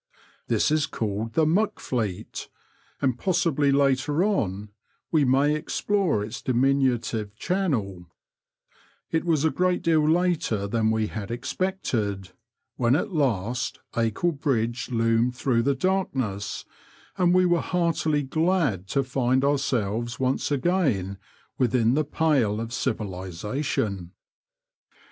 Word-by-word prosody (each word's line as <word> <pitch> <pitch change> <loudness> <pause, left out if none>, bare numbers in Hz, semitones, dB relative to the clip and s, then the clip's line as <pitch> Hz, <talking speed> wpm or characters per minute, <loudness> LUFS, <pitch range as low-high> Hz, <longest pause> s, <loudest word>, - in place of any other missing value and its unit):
This - - +2
is 155 -1 +2
called 110 +1 -3
the 160 - +3
Muck 195 +8 +1
Fleet, 110 -8 -4 0.5
and 130 -3 +1
possibly 165 -6 +2
later 140 +3 +2
on 105 - -1 0.4
we 155 -3 +4
may 135 +3 +3
explore 165 - 0
its 110 +3 -7
diminutive 125 -5 +1
channel 115 - -2 1.0
It 160 +1 0
was 160 -3 +2
a 160 - +3
great 180 0 0
deal 155 -2 +3
later 165 - +1
than 110 +1 +1
we 110 0 +1
had 105 -2 -6
expected 120 - -2 0.5
when 120 +1 +3
at 195 +5 -1
last 125 - 0 0.2
Acle 115 +9 +1
Bridge 125 -6 -1
loomed 115 +1 +1
through 120 -2 +1
the 140 +3 +1
dark 185 +4 0
ness, 105 -6 -3 0.5
and 180 -2 +3
we 185 0 +4
were 175 -1 +2
heartily 165 -4 0
glad 145 - 0
to 140 +6 +1
find 130 0 +1
ourselves 120 -4 0
once 130 0 0
again 135 - 0 0.4
within 120 -2 +3
the 155 +3 +2
pale 135 -9 +1
of 115 0 -4
civilisatioo. 100 - -3
130 Hz, 120 wpm, -25 LUFS, 110-160 Hz, 1.0 s, we